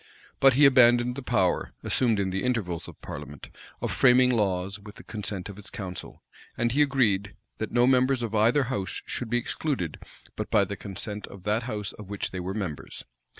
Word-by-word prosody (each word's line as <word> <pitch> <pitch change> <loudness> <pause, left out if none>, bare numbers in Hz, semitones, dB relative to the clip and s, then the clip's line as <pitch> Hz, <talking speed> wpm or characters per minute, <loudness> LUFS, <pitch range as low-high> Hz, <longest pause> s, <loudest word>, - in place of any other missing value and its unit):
But 135 -2 +6
he 145 +2 +7
abandoned 125 -2 +5
the 140 - -5
power, 100 -8 0
assumed 115 -5 +1
in 95 -1 0
the 95 +1 -2
intervals 105 -10 -1
of - - -12
parliament, 70 -1 -8 0.3
of - - 0
framing 125 0 +5
laws 100 -3 0
with 105 0 -12
the - - -13
consent 100 -3 -4
of 100 -1 -9
his 105 - -6
council; 95 -3 -7 0.3
and 120 0 +1
he 145 +5 +3
agreed, 110 -9 +2 0.2
that 110 - -3
no 120 0 +4
members 130 0 +3
of 115 -2 -3
either 115 +7 +4
house 120 -8 -3
should 120 - -3
be 120 - +2
excluded 120 - -3 0.4
but - - -4
by - - +4
the - - -5
consent 105 +2 -6
of 95 -2 -12
that 105 +3 +1
house 105 -3 -3
of 105 -2 -11
which 100 -1 -3
they 95 - -5
were 95 +2 -4
members. 90 -9 -5
110 Hz, 195 wpm, -27 LUFS, 95-125 Hz, 0.4 s, he